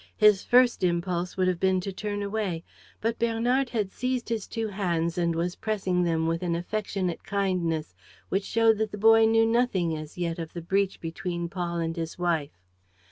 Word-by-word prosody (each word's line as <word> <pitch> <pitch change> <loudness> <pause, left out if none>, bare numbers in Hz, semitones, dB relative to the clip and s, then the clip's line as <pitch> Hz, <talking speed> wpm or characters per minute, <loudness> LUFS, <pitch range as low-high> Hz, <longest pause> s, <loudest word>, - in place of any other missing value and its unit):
His 210 -2 +5
first 245 -4 +4
impulse 175 0 -1
would 185 -1 +2
have 180 -2 0
been 190 0 +2
to 195 +1 -5
turn 205 +1 -3
away; 200 -5 -2 0.4
but 230 +1 -1
Bernard 240 +3 +1
had 210 -5 -1
seized 250 -1 -2
his 225 -4 -2
two 225 -1 -3
hands 170 -4 -1
and 170 -2 0
was 175 +2 -1
pressing 190 -5 -1
them 165 -2 +1
with 165 0 0
an 175 -2 0
affectionate 185 0 -3
kindness 180 - -1 0.4
which 195 +2 0
showed 225 0 +3
that 220 0 0
the 205 - -6
boy 225 +2 +6
knew 225 0 +4
nothing 225 -8 +1
as 155 +1 -8
yet 170 -1 -2
of 165 -1 -6
the 170 - -5
breach 195 +2 0
between 170 +1 -4
Paul 175 -1 -3
and 165 -1 -2
his 165 -1 -4
wife. 165 - -1
185 Hz, 190 wpm, -27 LUFS, 170-220 Hz, 0.4 s, boy